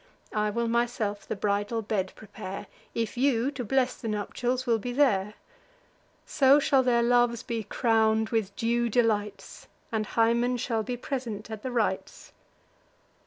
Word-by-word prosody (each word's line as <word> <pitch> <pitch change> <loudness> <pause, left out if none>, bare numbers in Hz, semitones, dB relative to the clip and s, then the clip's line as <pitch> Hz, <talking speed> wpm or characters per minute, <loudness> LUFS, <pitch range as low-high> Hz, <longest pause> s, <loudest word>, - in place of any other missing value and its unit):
I 210 0 +1
will 235 +2 -1
myself 230 -3 -1
the - - -2
bridal 205 +3 -1
bed 195 -3 -2
prepare, 195 -2 -8 0.3
If 230 0 -2
you, 260 0 +2
to 265 -3 -5
bless 255 +2 +1
the 230 - -7
nuptials, 245 +4 -2
will 230 -3 +2
be 245 +4 -4
there: 215 -7 +2 0.9
So 275 0 +5
shall 275 -2 +3
their 240 -2 +2
loves 240 -1 +3
be 230 -3 -3
crown'd 220 -1 +2
with 215 -4 -1
due 235 0 +1
delights, 210 -4 -1 0.2
And 215 -2 -1
Hymen 235 +3 +2
shall 230 -2 -1
be 245 +3 -4
present 235 -5 -5
at 220 -1 -6
the 255 - -4
rites." 220 -5 -2
230 Hz, 150 wpm, -27 LUFS, 210-245 Hz, 0.9 s, So